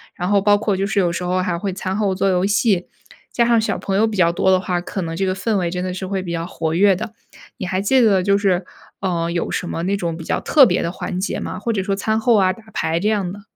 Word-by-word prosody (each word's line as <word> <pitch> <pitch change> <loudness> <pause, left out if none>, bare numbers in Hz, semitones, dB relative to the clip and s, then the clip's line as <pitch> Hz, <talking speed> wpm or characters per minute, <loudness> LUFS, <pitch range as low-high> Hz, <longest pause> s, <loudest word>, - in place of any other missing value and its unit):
然 180 - -3
后 200 -1 +3
包 205 +1 +4
括 205 -1 0
就 195 +1 -1
是 200 0 0
有 175 -3 +2
时 170 +1 -4
候 180 +1 0
还 180 -2 -1
会 195 +1 -2
餐 185 0 -3
后 200 -2 0
做 195 +1 +1
游 180 -1 +1
戏， 195 -2 +1 0.4
加 235 - +2
上 235 -1 +3
小 220 - -1
朋 195 - -3
友 220 +2 +3
比 215 -2 -4
较 170 -2 +4
多 180 +2 +1
的 185 - +4
话， 180 -1 -2
可 185 +1 -4
能 165 0 -4
这 190 +3 -1
个 185 - 0
氛 205 +2 -1
围 175 -3 0
真 180 +1 -3
的 185 0 -3
是 190 +1 -5
会 190 -1 -2
比 175 - -5
较 165 -1 -2
活 160 -3 -3
跃 195 +3 +4
的， 200 - -6 0.4
你 - - -4
还 185 +1 -1
记 255 +7 +3
得 200 -5 +4
就 200 +1 +3
是， 190 -3 +1 0.3
呃， 170 -3 -1
有 170 0 -2
什 180 - -3
么 165 - -3
那 195 +3 0
种 170 -4 -3
比 165 - -8
较 - - -1
特 290 -4 +6
别 180 -5 +1
的 170 - -2
环 180 0 -5
节 190 - -2
吗？ 185 - -5
或 230 +3 -2
者 200 -4 -1
说 195 +1 -1
餐 220 +2 0
后 230 +1 +3
啊， 190 -3 +4
打 225 +4 -10
牌 165 +1 0
这 205 +4 +1
样 200 -5 -1
的。 205 +2 -9
190 Hz, 320 characters per minute, -20 LUFS, 180-205 Hz, 0.4 s, 特